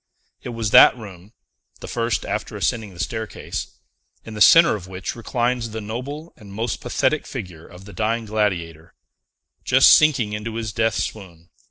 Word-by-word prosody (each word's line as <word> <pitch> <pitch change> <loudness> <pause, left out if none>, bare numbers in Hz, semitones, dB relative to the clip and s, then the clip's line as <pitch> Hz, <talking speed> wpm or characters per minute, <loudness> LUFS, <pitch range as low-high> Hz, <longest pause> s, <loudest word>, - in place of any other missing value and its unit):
It - - -7
was 115 -3 -3
that - - +8
room 100 -3 -12 0.5
(the - - -9
first, 115 -1 -2
after - - -4
ascending 110 -4 -2
the - - -14
staircase) 110 +2 -5 0.6
in 110 - -9
the 105 - -7
centre 165 +7 +7
of 95 -4 -9
which 95 0 -6
reclines 120 0 -2
the 110 +1 -6
noble 130 +9 -7
and 105 -4 -14
most 110 +3 -4
pathetic 135 +4 -1
figure 90 - -8
of 90 +2 -14
the 105 - -12
Dying 115 +1 -1
Gladiator, 90 -7 -3 0.7
just - - +6
sinking 130 -9 +4
into 110 +2 -5
his 110 -2 -4
death 115 0 0
swoon. 85 -5 -6
110 Hz, 165 wpm, -21 LUFS, 100-120 Hz, 0.7 s, that